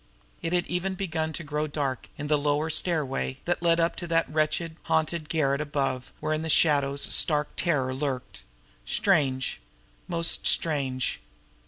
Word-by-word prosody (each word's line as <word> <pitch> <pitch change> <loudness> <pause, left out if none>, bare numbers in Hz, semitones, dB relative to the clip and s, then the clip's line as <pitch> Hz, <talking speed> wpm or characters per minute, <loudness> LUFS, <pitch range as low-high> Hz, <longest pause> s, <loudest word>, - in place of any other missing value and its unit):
It 165 - -2
had 175 -1 +2
even 185 +2 -2
begun 165 -4 -2
to 170 - -4
grow 150 +1 -2
dark 140 -3 -3
here - - -6
on - - -3
the 150 - +4
lower 150 +2 +1
stairway 135 - 0
that 175 0 0
led 170 -1 +3
up 165 0 +2
to 175 - -4
that 165 0 +2
wretched, 155 +2 0
haunted 160 0 0
garret 140 -3 +1
above 135 -4 -2
where 155 0 -1
in 155 - -1
the 160 - -3
shadows 140 -3 +3
stark 150 -3 +2
terror 140 -7 +1
lurked. 130 - -4 0.4
Strange! 130 - +1 0.5
Most 170 0 +2
strange! 135 -6 0
155 Hz, 160 wpm, -27 LUFS, 140-165 Hz, 0.5 s, the